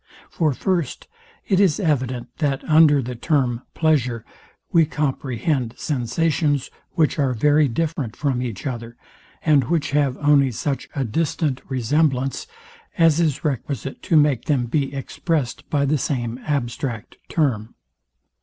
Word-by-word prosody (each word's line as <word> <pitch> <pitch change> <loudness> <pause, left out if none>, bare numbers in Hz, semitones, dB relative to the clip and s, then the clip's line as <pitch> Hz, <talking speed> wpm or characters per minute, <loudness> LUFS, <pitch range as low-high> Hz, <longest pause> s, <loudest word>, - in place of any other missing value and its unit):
For, 155 -3 +1
first, 170 -1 -2 0.4
tis 190 -5 +3
evident, 130 - -1
that 140 -4 0
under 155 -3 +5
the 125 +2 -5
term 125 -2 0
pleasure, 130 -8 +1 0.5
we 170 -3 +5
comprehend 135 -4 -1
sensations, 145 +1 0 0.2
which 155 -1 +1
are 135 -3 +1
very 145 +5 +4
different 140 -2 -2
from 135 -4 -1
each 120 -3 -5
other, 120 -3 -5 0.5
and 145 -5 +4
which 165 -1 0
have 140 -3 +1
only 145 -2 +4
such 135 +5 -3
a 135 -3 0
distant 145 +2 -1
resemblance, 135 - 0 0.5
as 165 -2 +4
is 160 -3 0
requisite 135 -1 -3
to 165 - 0
make 145 -5 +3
them 140 -6 +1
be 135 +3 -1
expressed 140 0 -3
by 140 -2 +1
the 145 +1 +1
same 120 -3 -2
abstract 120 -4 -3
term. 120 -9 0
140 Hz, 130 wpm, -22 LUFS, 125-155 Hz, 0.5 s, under